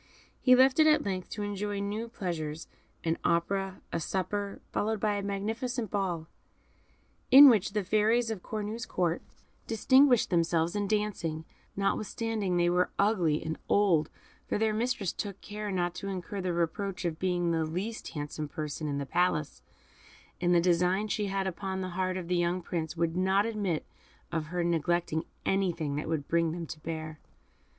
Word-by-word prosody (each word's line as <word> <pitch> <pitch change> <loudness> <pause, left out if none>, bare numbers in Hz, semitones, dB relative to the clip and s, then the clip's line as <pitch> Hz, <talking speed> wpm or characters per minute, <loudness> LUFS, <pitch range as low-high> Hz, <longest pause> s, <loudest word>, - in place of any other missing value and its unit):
He 255 -1 +6
left 260 +3 +5
it 310 - +7
at 305 - +4
length 185 -2 -3
to 210 - -4
enjoy 205 0 -3
new 210 +3 -3
pleasures 165 -8 -4 0.4
an 165 0 0
opera, 190 +3 0
a 170 - 0
supper, 200 +4 -2
followed 220 +1 0
by 210 0 +1
a 205 - -1
magnificent 220 +4 -3
ball, 180 -5 -1 1.0
in 275 +2 +11
which 210 -4 +2
the 210 -1 0
fairies 220 +4 +2
of 210 -5 -4
Cornue's 215 +2 -4
Court 175 -2 0 0.5
distinguished 255 +2 +4
themselves 170 0 +2
in 205 -1 0
dancing, 190 -7 -1 0.3
notwithstanding 205 -1 -1
they 175 0 +3
were 180 +1 +2
ugly 180 -7 +2
and 160 0 -4
old, 175 -7 +3 0.4
for - - 0
their 220 0 +1
mistress 225 -4 -1
took 200 -2 -5
care 210 0 -6
not 175 -2 0
to 195 - -6
incur 195 +1 -4
the 185 -1 -1
reproach 180 +3 -2
of 160 -2 -2
being 175 -2 +1
the 165 -1 +1
least 185 +8 -4
handsome 150 0 -4
person 150 +1 -4
in 140 -1 -2
the 140 - -2
Palace; 165 -1 0 0.8
and 175 0 +2
the 175 - +6
designs 180 +4 +2
she 210 -1 -1
had 195 0 -1
upon 190 +1 -3
the 185 - -3
heart 185 +1 -1
of 180 -2 -5
the 180 0 +1
young 175 +1 0
Prince 165 -1 -3
would 165 0 0
not 190 +2 +3
admit 205 -8 -1 0.5
of 160 -2 -2
her 175 +2 -1
neglecting 170 -1 0 0.2
anything 175 -7 0
that 150 +2 -3
would 155 -3 -2
bring 165 -1 +1
them 170 -1 -4
to 155 0 -8
bear. 155 -1 -5
185 Hz, 170 wpm, -30 LUFS, 170-210 Hz, 1.0 s, in